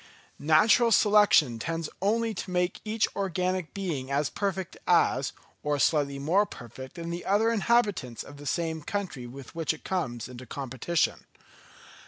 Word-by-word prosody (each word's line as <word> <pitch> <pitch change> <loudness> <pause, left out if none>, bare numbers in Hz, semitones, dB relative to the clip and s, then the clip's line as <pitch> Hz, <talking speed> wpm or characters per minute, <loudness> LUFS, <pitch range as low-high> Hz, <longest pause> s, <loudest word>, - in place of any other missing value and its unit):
Natural 215 +10 +5
selection 205 - +5
tends 165 +4 -3
only 225 +3 +1
to 190 - -6
make 180 0 0
each 215 0 +1
organic 185 -2 -1
being 160 -10 -3
as 140 0 0
perfect 190 -3 -3
as, - - +3 0.3
or 150 0 0
slightly 140 -1 +2
more 175 +9 +2
perfect 130 +3 -10
than 170 -1 -5
the 175 +1 -4
other 210 +4 +2
inhabitants 205 - +1
of 145 - -12
the 145 0 -9
same 160 +1 -1
country 180 - -4
with 130 +1 -11
which 165 -1 -1
it - - -18
comes 125 - -2
into 125 0 -10
competition. 135 +6 -1
170 Hz, 150 wpm, -28 LUFS, 140-200 Hz, 0.3 s, Natural